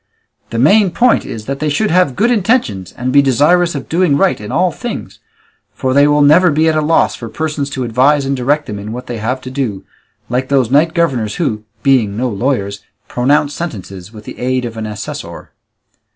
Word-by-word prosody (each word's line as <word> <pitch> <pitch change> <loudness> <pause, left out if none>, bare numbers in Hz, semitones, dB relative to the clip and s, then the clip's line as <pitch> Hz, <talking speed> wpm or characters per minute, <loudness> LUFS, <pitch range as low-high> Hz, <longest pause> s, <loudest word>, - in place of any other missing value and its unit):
The 115 - -4
main 195 - +4
point 245 +7 +2
is 110 -1 -7
that 135 +2 -4
they 155 - -1
should 210 +8 0
have 175 -7 +2
good 230 +4 +2
intentions 190 - 0
and 125 +1 -3
be 140 - +6
desirous 150 +6 +2
of 140 - -5
doing 165 -4 +2
right 190 - +1
in 105 - -7
all 180 +6 +1
things, 240 -3 -7 0.6
for 130 0 -1
they 140 +1 +5
will 145 0 +3
never 165 +5 +5
be 155 +1 +2
at 160 - +2
a 155 - +2
loss 160 +2 +2
for 115 - -8
persons 150 0 -3
to 130 -2 -4
advise 135 +5 +2
and 135 0 -1
direct 145 +4 0
them 105 -1 -6
in 105 +2 -6
what 125 +1 -7
they 120 -3 -5
have 125 +4 -2
to 130 - -8
do, 125 -8 -3 0.4
like 125 +2 -2
those 130 -4 +1
knight 160 +4 +3
governors 130 -11 0
who, 110 -11 -2 0.2
being 115 -7 +2
no 125 +2 0
lawyers, 100 -3 -2 0.3
pronounce 140 +3 +1
sentences 100 - -7
with 105 -2 -12
the - - -10
aid 125 0 -1
of 115 -1 -6
an 110 -1 -5
assessor. 105 -1 -7
135 Hz, 210 wpm, -15 LUFS, 115-155 Hz, 0.6 s, be